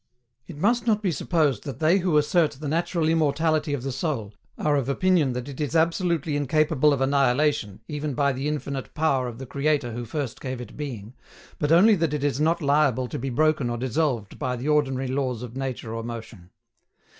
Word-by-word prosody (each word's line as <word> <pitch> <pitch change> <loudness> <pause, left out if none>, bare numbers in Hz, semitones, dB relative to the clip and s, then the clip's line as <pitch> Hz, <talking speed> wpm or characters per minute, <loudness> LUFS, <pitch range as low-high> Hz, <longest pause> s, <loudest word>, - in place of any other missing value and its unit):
It 160 - -9
must 235 +8 +1
not 215 -1 +2
be 190 - +1
supposed 155 -4 0
that 140 - -6
they 165 +5 +3
who 175 -4 +2
assert 155 +1 +2
the 145 +2 -7
natural 165 +1 0
immortality 160 -1 +1
of 125 - -6
the 135 - -2
soul 125 -6 -3 0.2
are 150 -1 +1
of 135 -2 0
opinion 160 -3 +2
that 125 +1 -5
it 140 0 -7
is 150 +2 -2
absolutely 165 -2 +1
incapable 150 +1 +2
of 140 -2 0
annihilation 135 -5 +1
even 150 -2 -3
by 140 +1 +2
the 135 +3 -3
infinite 140 -3 -4
power 140 -5 +1
of 120 -2 -7
the 135 - -7
Creator 140 -1 0
who 120 +1 -5
first 130 0 -4
gave 130 -2 -4
it 120 -3 -9
being, 120 -7 -6 0.5
but 150 0 0
only 195 +7 +7
that 165 -6 +1
it 145 - -3
is 145 -1 0
not 160 +1 +1
liable 140 -3 +2
to - - -4
be 135 +2 -3
broken 150 0 +1
or 120 - -2
dissolved 125 -3 -1
by 125 -1 -1
the 125 +4 -5
ordinary 135 -3 +1
laws 130 -3 -2
of 120 0 -8
nature 130 -4 -4
or 115 - -3
motion. 115 -6 -8
145 Hz, 200 wpm, -25 LUFS, 125-155 Hz, 0.5 s, only